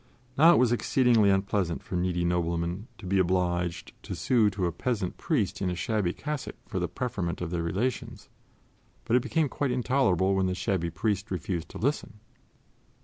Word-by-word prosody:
Now, 165 +5 +7
it - - +4
was 125 -2 +4
exceedingly 120 -3 +3
unpleasant 95 -3 0
for - - -6
needy 90 -1 0
noblemen 85 +3 -1
to 110 - -11
be 95 +1 +1
obliged 90 -1 0
to - - -6
sue 125 -5 +3
to 95 -2 -2
a 85 - 0
peasant 100 +1 -2
priest 110 - -1
in 95 - +1
a 90 - -2
shabby 90 +1 0
cassock 150 +5 -5
for 95 - -3
the 90 - -1
preferment 90 -4 -3
of 90 -2 -4
their 85 -1 -1
relations; 100 +10 -3 0.8
but 115 - +2
it 125 - +4
became 160 +4 +1
quite 140 +1 -2
intolerable 125 -7 +2
when 95 -1 +2
the 90 - -1
shabby 90 -3 -1
priest 100 +5 -2
refused 90 -2 -3
to - - -9
listen. 120 -4 -2
95 Hz, 180 wpm, -28 LUFS, 90-120 Hz, 0.8 s, Now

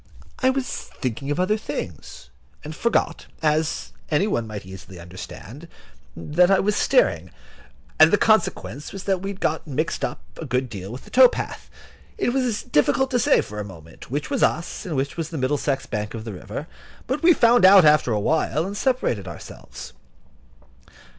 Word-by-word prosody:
I 260 - +3
was 260 -1 -1
thinking 130 +3 -5
of 145 - -1
other 185 +4 +2
things, 115 - -7 0.3
and 155 +1 -7
forgot, 235 +7 0 0.2
as 155 0 0 0.2
any 155 +5 +2
one 120 - -1
might 105 -3 -7
easily 95 -1 -11
understand, 95 - -10 0.5
that 160 - +2
I 195 - +4
was 210 +1 +1
steering, 90 - +2 0.7
and - - +9
the - - +3
consequence 140 +5 +1
was 195 -1 -7
that 190 -2 0
we 195 - -4
had 200 -1 -7
got 160 +1 -1
mixed 155 +3 -2
up - - -3
a 165 - -6
good 125 0 -1
deal 95 0 -7
with 125 - -8
the - - -16
tow 255 -1 +8
path. - - -6 0.5
It 395 - 0
was 250 -5 0
difficult 265 - +1
to 250 - +2
say, - - +4
for 105 +1 -8
the - - -2
moment, 80 -5 -12
which 145 +4 -3
was - - 0
us 170 +3 0
and 165 - -3
which 135 +3 -2
was 165 -1 -3
the 165 - -6
Middlesex 135 0 -1
bank 105 +1 -4
of 110 - -6
the 110 - -6
river; 105 - -7 0.4
but 260 +5 -2
we 350 - +6
found 240 - +4
out 190 -2 +8
after 150 -5 +4
a 105 - +1
while, 155 +6 0
and 200 +2 -5
separated 205 - 0
ourselves. 85 - -10
150 Hz, 185 wpm, -23 LUFS, -, 0.7 s, and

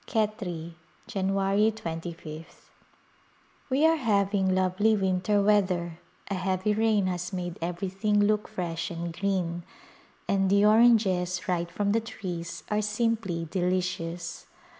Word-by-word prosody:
Khetri^ 190 -7 -2 0.3
Jan, 195 -1 -2
2^th. 195 -5 -1 1.2
We 275 +4 +3
are 325 0 +5
having 200 -6 +1
lovely 190 +4 +2
winter 195 +1 +1
weather; 185 -5 +1 0.3
a 200 - -3
heavy 185 +2 0
rain 215 -2 +2
has 180 0 -2
made 175 -2 -4
everything 190 +4 -1
look 210 +1 +2
fresh 175 0 -3
and 170 -1 -5
green, 180 -2 -1 0.7
and 195 -1 +2
the 200 +1 +4
oranges 210 -5 +4
right 175 -1 0
from 200 +3 -1
the 225 +2 +2
trees 180 -6 -6
are 210 0 +2
simply 210 -6 -1
delicious. 175 -2 -2
190 Hz, 120 wpm, -27 LUFS, 175-210 Hz, 1.2 s, are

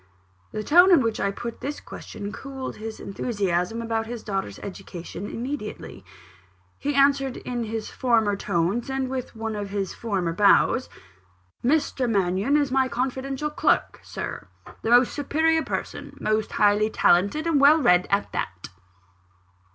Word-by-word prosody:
The 215 - -4
tone 350 - +6
in 340 - +7
which 230 -2 -1
I 200 - +1
put 235 +4 -6
this 290 +2 -4
question, 205 -1 -8
cooled 265 +1 -7
his 220 +1 -7
enthusiasm 200 0 -2
about 225 -1 -2
his 235 -1 -6
daughter's 195 - -3
education 190 -1 -8
immediately. 235 - -6 0.8
He 290 0 -2
answered 275 -1 +3
in 240 -2 -4
his 220 0 -5
former 225 -5 +2
tones, 195 +5 -1
and 265 -1 -2
with 255 -3 -5
one 225 -1 -4
of 205 -1 -4
his 195 -1 -3
former 190 -7 -2
bows: 210 +6 +4 0.7
"Mr. 265 -2 +1
Mannion 195 +6 +2
is 285 -3 0
my 265 0 +3
confidential 265 +3 -2
clerk, - - +1
Sir - - -6 0.2
a - - -7
most 245 +1 +5
superior 320 +3 +1
person, - - -5
most 215 0 -1
highly 210 +1 +3
talented, 200 - +2
and 320 -4 +2
well 290 +3 +7
read, 180 - +4
and 200 +1 +2
all - - -26
that." 85 +1 -4
230 Hz, 150 wpm, -25 LUFS, 200-270 Hz, 0.8 s, in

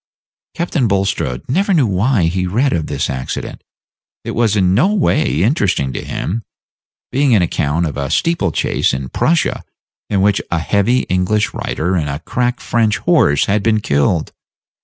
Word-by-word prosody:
Captain 170 -7 0
Bulstrode 95 - -1
never 190 +8 +1
knew 145 -6 +3
why 105 +1 +1
he 90 +2 0
read 125 +9 +1
of 80 -3 -1
this - - -2
accident. 65 -1 -5 0.6
It - - -4
was 115 -2 +1
in 95 -3 +2
no 185 - +3
way 150 - +1
interesting 95 - +1
to - - -5
him, 110 +6 -3 0.7
being 135 -2 +3
an 95 - +3
account 80 0 0
of 75 - -4
a 70 -1 -3
steeple 100 - +1
chase - - 0
in 65 -1 -5
Prussia, 165 0 0 0.5
in 100 -2 +1
which 100 0 +2
a 85 - 0
heavy 100 +9 +1
English 95 +3 0
rider 90 +4 -2
and 80 -5 0
a 70 - -3
crack 125 - -2
French 115 -1 +1
horse 120 - +3
had 105 +1 +1
been 110 0 +2
killed. 75 -1 0
100 Hz, 165 wpm, -17 LUFS, 85-125 Hz, 0.7 s, knew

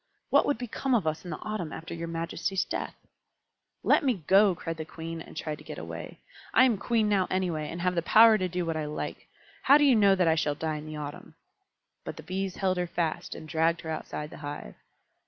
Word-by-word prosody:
What - - +5
would 285 - +1
become 250 +2 -1
of 210 -8 +1
us 155 0 -1
in 180 - -8
the 155 - -4
autumn 210 -8 -4
after 165 - -7
your 170 0 -5
majesty's 165 +3 -2
death?" - - -4 0.9
"Let - - +4
me 240 - 0
go!" 195 +1 +5
cried 165 0 -5
the 160 - -4
Queen, 165 +1 -7
and - - -11
tried 155 -2 -4
to - - -13
get - - -8
away. - - -7 0.4
"I - - +8
am 240 -6 +3
Queen 225 0 +1
now 195 -3 +2
anyway, 170 -5 -1
and 170 +1 -5
have 180 0 +1
the 170 - +1
power 220 +5 +7
to 185 -1 -1
do 180 0 -2
what 165 -1 -2
I 155 -1 -2
like. 150 0 -5 0.3
How 280 +2 +7
do 295 - +3
you 275 -4 +6
know 200 -3 +5
that 180 -2 +2
I 160 - +5
shall 155 -2 0
die 155 0 -2
in 150 +1 -8
the 155 - -6
autumn?" 145 -1 -8 0.7
But - - -7
the - - -9
Bees 190 0 -3
held 185 -2 0
her 180 0 -1
fast, 165 -2 -2
and 155 - -9
dragged 165 +1 +1
her 160 - -5
outside 150 -1 -5
the - - -9
hive. 145 - -7
170 Hz, 235 wpm, -28 LUFS, 160-195 Hz, 0.9 s, I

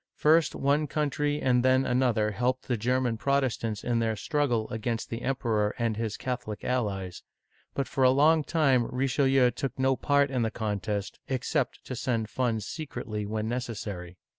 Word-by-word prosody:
First 160 +2 +3
one 145 +2 +1
country 145 0 -1
and 125 -3 +2
then 130 +1 +4
another 125 -4 +2
helped 125 +5 -1
the 125 - +1
German 125 +1 0
Protestants 120 -4 0
in 120 -1 +1
their 110 -1 0
struggle 125 -4 0
against 115 0 -3
the 115 +1 -4
Emperor 115 -6 0
and 115 -3 0
his 110 -1 -3
Catholic 125 -5 -4
allies; 100 -8 -2 0.5
but 140 - -1
for 135 - 0
a 130 - +7
long 150 +4 +4
time 135 -7 +2
Richelieu 135 0 +2
took 135 +3 -4
no 130 0 +2
part 145 +1 +2
in 130 -2 0
the 110 - +1
contest, 105 -2 -3
except 130 -2 -1
to 130 - -5
send 115 -3 -2
funds 115 -5 -1
secretly 120 -9 -5
when 110 +1 -2
necessary. 105 -7 -5
125 Hz, 165 wpm, -28 LUFS, 110-135 Hz, 0.5 s, a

